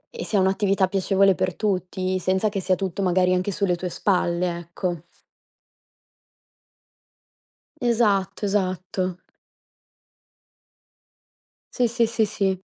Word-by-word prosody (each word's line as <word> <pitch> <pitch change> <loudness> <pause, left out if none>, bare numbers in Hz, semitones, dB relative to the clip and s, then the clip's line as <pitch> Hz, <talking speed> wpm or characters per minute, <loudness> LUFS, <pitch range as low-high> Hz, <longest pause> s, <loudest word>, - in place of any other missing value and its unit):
e - - -4
sia 205 - +1
un'attività 195 0 +2
piacevole 195 0 +3
per 185 0 -2
tutti, 185 -2 -1
senza 190 +3 +1
che 200 -1 -3
sia 185 0 +2
tutto, 190 +1 -3
magari, 185 0 +3
anche 185 +2 0
sulle 185 -2 0
tue 180 +1 -4
spalle, 175 -2 0
ecco. 175 0 -4 2.8
Esatto, 210 -5 +1
esatto. 185 -2 -1 2.6
Sì, 245 -2 +3
sì, 235 0 +1
sì, 225 0 0
sì. 195 -3 -1
190 Hz, 105 wpm, -24 LUFS, 185-200 Hz, 2.8 s, piacevole